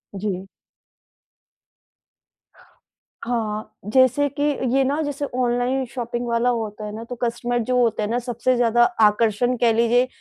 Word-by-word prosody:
जी। 195 -1 -3 2.8
हाँ। 220 -3 -3 0.2
जैसे 260 +2 +4
कि 290 - +1 0.3
ये 270 - +4
ना 285 +4 0
जैसे 290 -1 -3
ऑनलाइन 250 +1 0
शॉपिंग 240 0 -4
वाला 235 +1 +1
होता 220 -3 -3
हैं 210 - -5
ना 225 - -6
तो 245 - -4
कस्टमर 240 +1 -1
जो 250 - +2
होते 225 -3 +1
हैं 210 - -2
ना 240 +2 0
सबसे 245 +1 -1
ज़्यादा 240 0 +3 0.2
आकर्षण 220 +3 +3
कह 230 -1 +4
लीजिए 235 +2 +3
240 Hz, 140 wpm, -22 LUFS, 225-250 Hz, 2.8 s, जैसे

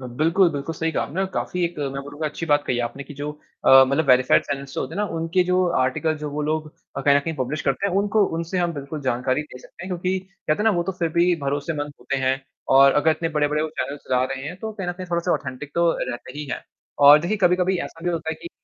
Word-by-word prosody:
ब 130 - -9
बिल्कुल, 170 +5 +4
बिल्कुल 145 +3 -4
सही 160 +1 -2
कहा - - 0
आपने 170 +7 -4
और 195 - +1
काफ़ी 180 -1 -1
एक 170 0 -2
मैं 140 -1 -3
बोलूँगा 145 +2 -5
अच्छी 155 +2 -5
बात 145 -1 +3
कही 125 - 0
आपने 120 +4 -6
कि 145 - -11
जो 145 +2 -4 0.3
अ, 135 0 +9
मतलब 140 +3 0
वेरीफाइड 130 0 +5
चैनल्स 140 -1 -5
जो - - -2
होते 145 +5 -4
हैं 200 - -2
ना, - - +2
उनके 165 +3 +1
जो 180 0 +2
आर्टिकल 155 +5 +1
जो 150 0 -5
वो 150 +1 -3
लोग 155 +1 -2 0.3
अ, - - -1
कहीं 140 +1 +4
न - - +3
कहीं 160 +3 -4
पब्लिश 135 +3 -2
करते 135 +8 0
हैं 190 - -2
उनको 205 +1 +3
उनसे 170 +3 -2
हम 175 -1 +1
बिल्कुल 145 +2 -6
जानकारी 130 +2 0
दे 150 -4 -12
सकते 170 - -12
हैं। - - -7
क्योंकि 185 +1 -1
कहते 190 -5 -4
हैं - - -1
ना 225 - +5
वो 175 - +1
तो 190 - -3
फ़िर 170 - +1
भी 175 +1 +4
भरोसेमंद 145 +1 -2
होते 135 - -2
हैं 130 0 0 0.4
और 135 0 +7
अगर 145 +2 +3
इतने 165 +1 -1
बड़े-बड़े 150 -1 0
वो 160 - -2
चैनल्स 145 +1 -4
चला 125 0 +2
रहे 135 0 -4
हैं, 170 +4 -6
तो 220 +2 -5
कहीं 195 -4 -5
न - - 0
कहीं 185 - -6
थोड़ा-सा 170 +1 +1
ऑथेंटिक 130 +2 -4
तो 170 0 +3 0.2
रहते 130 +3 -7
ही 150 - -4
हैं। - - -4 0.4
और 145 +1 +9
देखिए, 175 +7 -1
कभी-कभी 180 -1 +2
ऐसा 165 +1 -11
भी 175 - +1
होता 165 -2 -2
है - - -3
कि, 340 - -7
155 Hz, 270 wpm, -23 LUFS, 140-175 Hz, 0.4 s, अ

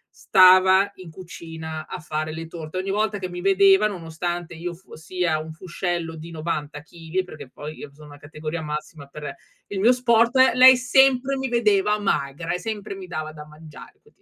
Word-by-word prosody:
stava 185 +1 +5
in 185 -3 -11
cucina 160 -2 -8
a - - -6
fare 155 0 -4
le 165 +1 -6
torte, 160 +1 -8
ogni 190 +1 -2
volta 210 0 0
che 185 -2 -5
mi 175 0 -7
vedeva 195 +1 +5
nonostante 175 -2 -5
io 170 +1 -6
fossi 180 0 -6
a 155 -2 +1
un 160 +1 -7
fuscello 170 -1 -4
di 160 +2 -10
90 155 -2 -4
chili, 170 +3 -4
perché 150 -7 -11
poi 150 +3 -9
io 145 - -8
sono 150 +1 -15
una 145 - -13
categoria 155 +2 -6
massima 150 -1 -6
per 150 0 -8 0.4
il 200 -1 -4
mio 230 +5 +5
sport, 235 0 +2 0.2
lei 255 0 +8
sempre 265 +1 +3
mi 265 -1 -3
vedeva 210 -3 +2
magra 150 -4 -2
e 180 - -2
sempre 210 -2 -5
mi 190 -1 -9
dava 155 -3 -5
da 150 -1 -10
mangiare, 155 0 -14
quindi. - - -27
175 Hz, 185 wpm, -23 LUFS, 155-195 Hz, 0.4 s, lei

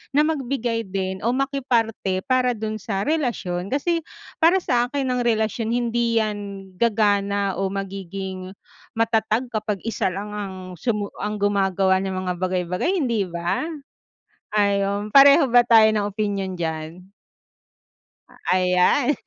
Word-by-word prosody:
na 295 - +6
magbigay 245 -6 -2
din 190 0 -3
o 235 - +3
makiparte 240 -8 0
para 255 -1 +3
dun 215 0 -4
sa 195 -2 -3
relasyon. 230 - -1
Kas,i 330 +3 0 0.3
para 345 +4 +4
sa 245 -6 +1
akin 270 +1 -2
ang 250 -1 0
relasyon 225 0 0
hindi 235 -1 +1
yan 200 -2 -5
gagana 200 -3 +1
o 195 0 0
magiging 190 -1 -6 0.4
matatag 225 +1 0
kapag 215 -3 -3
isa 215 -4 -1
lang 200 +3 -5
ang 205 -2 -5 0.2
sumu 210 +1 -2
ang 210 0 -4
gumagawa 195 -2 +2
ng 190 - -3
mga 180 -1 -2
bagay-bagay 180 - -1
hindi 230 -7 0
ba? 170 - -2 0.9
Ayun 200 0 +1
pareho 280 +2 +8
ba 245 0 +6
tayo 225 -2 +6
ng 205 -1 0
opinyon 200 -2 -3
diyan? 165 +3 -5 1.4
Ayan. 185 +9 +3
210 Hz, 130 wpm, -23 LUFS, 190-240 Hz, 1.4 s, pareho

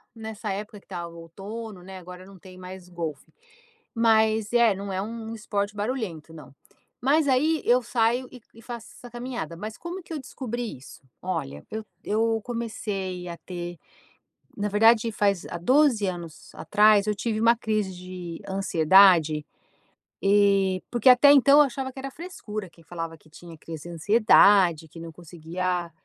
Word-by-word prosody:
nessa 220 -2 -6
época 210 +1 -6
que - - -29
estava 175 -3 -6
o 170 - -13
outono, 200 +4 -8
né, 190 +1 -9
agora 180 0 -11
não 195 0 -14
tem 185 0 -14
mais 185 0 -10
golfe. 165 -4 -6 0.6
Mas 220 -1 +2
é, 235 -3 +5
não 195 +1 -6
é 190 - -2
um 225 +1 -6
um - - -5
esporte 205 -1 -3
barulhento, 205 - -4
não. 155 -4 -13 0.5
Mas 285 +4 +3
aí 300 +4 +2
eu 250 +1 +4
saio 240 +1 0
e 250 -2 -12
e 230 - -15
faço 235 -1 -8
essa 245 - -12
caminhada, 240 -7 -6
mas 215 +4 -7
como 350 +2 -7
que 330 - -9
eu 305 - -3
descobri 245 - -6
isso? 130 - -14 0.2
Olha, 75 - -4
eu 220 0 -5 0.2
eu 225 +1 0
comecei 200 -6 -4
a 170 - -7
ter 175 -1 -7 0.8
na 205 0 -1
verdade 225 +2 +4
faz 200 -3 0
há - - -4
12 250 - +3
anos 170 -4 -7
atrás 210 -1 +4
eu 210 - +1
tive 215 +1 -2
uma 230 +1 +4
crise 215 -4 -2
de 180 -2 -8
ansiedade, 175 -4 +4 0.8
eh 195 -2 +3
porque 240 +1 +3
até 255 +3 +8
então 280 +1 +6
eu - - +10
achava 265 0 -4
que 265 - -12
era 275 +1 -6
frescura, 230 - -7
quem 165 -1 -21
falava 165 -1 -6
que 155 - -24
tinha 165 +1 -12
crise 160 0 -9
de 170 - -7
ansiedade, 190 -3 +4
que 165 - -12
não 165 0 -8
conseguia, 175 +1 -4
205 Hz, 170 wpm, -25 LUFS, 180-230 Hz, 0.8 s, eu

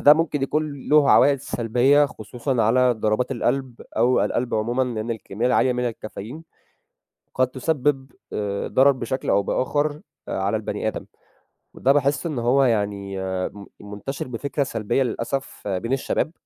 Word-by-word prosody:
ده 145 - +8
ممكن 150 -3 -1
يكون 145 -1 -2
له 150 -1 +5
عوائد 140 -2 +5
سلبية 125 +6 +3
خصوصًا 120 +2 -3
على 125 +3 +4
ضربات 110 +2 0
القلب 125 0 -2 0.2
أو 120 +3 +3
القلب 120 0 -1
عمومًا 120 +4 0
لأن 115 -2 -3
الكمية 110 +1 -3
العالية 125 0 +3
من 125 -1 -1
الcaffeine 110 +6 -8 1.0
قد 130 0 +3
تسبب 135 0 -1 0.2
آآ 100 -1 -2
ضرر 135 +2 +5
بشكل 130 0 -3
أو 100 - +3
بآخر 145 +7 -1 0.3
على - - -1
البني - - -3
آدم، - - -4 0.7
وده 135 - +2
باحس 140 +2 +1
إن 150 -7 -2
هو 125 +4 +3
يعني 100 -5 -1 0.3
من 100 -1 -11
منتشر 105 +8 -6
بفكرة 140 +4 -2
سلبية 115 0 0
للأسف 125 0 -4
بين 100 +6 -2
الشباب 135 +3 -1
125 Hz, 145 wpm, -23 LUFS, 115-140 Hz, 1.0 s, ده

